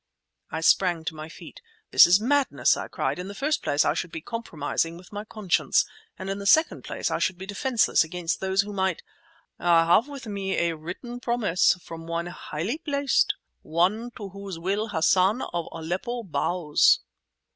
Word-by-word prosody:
I 160 - -4
sprang 175 -1 +3
to 160 - -2
my 155 0 -8
feet. - - -12 0.3
"That - - +9
is 180 +3 +5
madness!" 275 +5 +2
I - - -5
cried. - - -2
"In 180 - -5
the 200 - -8
first 295 +5 0
place 145 +1 +1
I - - +3
should 175 - -4
be 165 - -5
compromising 165 -5 -3
with 180 +4 -15
my 205 0 -4
conscience, 215 -4 +1 0.3
and 190 - -7
in 195 +1 -3
the 200 - -4
second 315 +9 +4
place - - -3
I - - 0
should 185 - 0
be 190 - -7
defenceless 220 +3 +2
against 170 +1 -3
those 190 +1 +2
who 205 +1 -7
might—" 190 -3 -1 0.6
"I 170 -1 +4
have 190 +9 +4
with 280 -4 -8
me 195 -3 -3
a 170 -1 +1
written 185 +10 -7
promise 235 -9 +2
from 165 0 -9
one 170 0 -2
highly 175 - -4
placed—one 240 - 0
to 205 -4 -7
whose 200 -2 -7
will 195 +6 -1
Hassan 190 +4 +2
of 170 -1 -2
Aleppo 185 +9 -4
bows!" 175 -4 +2
190 Hz, 180 wpm, -26 LUFS, 170-220 Hz, 0.6 s, That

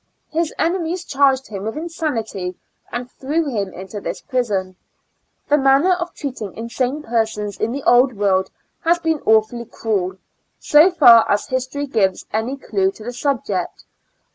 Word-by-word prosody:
His 330 0 0
enemies 345 0 -1
charged 270 -2 +2
him 200 -3 -6
with 220 +6 -4
insanity, 230 - -3 0.4
and 245 +1 -4
threw 295 +5 -2
him 205 -8 -2
into 190 +3 -8
this - - -4
prison. 205 -9 -2 0.7
The 295 +1 +3
manner 275 +6 +4
of 355 -1 -3
treating 250 - -6
insane 250 +5 -2
persons 220 -3 -2
in 225 - 0
the 275 +2 -4
Old 245 +1 +5
World 195 -2 +1 0.3
has 340 +1 +3
been 325 -3 -1
awfully 220 +2 +3
cruel, 200 -5 -2 0.4
so 305 +5 +5
far 245 -10 +7
as 205 - +1
history 260 +3 -2
gives 200 -8 0
any 230 +5 -1
clue 195 -7 0
to 215 - -12
the 245 +2 -5
subject. 230 -9 -2
245 Hz, 150 wpm, -20 LUFS, 210-290 Hz, 0.7 s, far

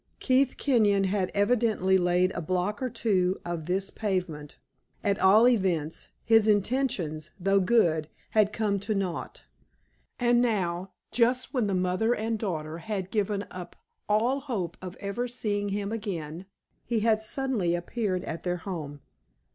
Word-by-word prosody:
Keith 260 0 +2
Kenyon 210 -7 +3
had 190 -1 0
evidently 205 -3 +2
laid 180 +1 +2
a - - -4
block 185 +6 -1
or 255 - -1
two 190 -6 +1
of 170 -2 -4
this 190 +2 -1
pavement; 180 -8 -3 0.5
at 200 -1 +1
all 210 +5 +6
events, 180 -10 0 0.2
his 225 -1 +5
intentions, 205 - 0
though 195 +2 +3
good, 170 -7 +2 0.2
had 215 -1 +3
come 210 -2 0
to 210 +2 -2
naught. 190 -4 -3 0.7
And 240 -1 +3
now, 190 -6 0 0.2
just 250 +4 +1
when 245 -6 +1
the 195 - 0
mother 185 +6 +1
and 220 +1 -2
daughter 160 -6 -3
had 190 0 -4
given 205 -1 0
up 180 -1 -8 0.3
all 235 +6 +2
hope 205 - -3
of 185 -1 -7
ever 215 +5 -3
seeing 205 -4 -2
him 200 +1 -2
again, 185 -6 -5 0.4
he 230 -2 -1
had 220 -1 +3
suddenly 220 -7 0
appeared 185 +1 -2
at 165 - -5
their 180 -1 -1
home. 160 -6 -6
200 Hz, 145 wpm, -28 LUFS, 180-225 Hz, 0.7 s, all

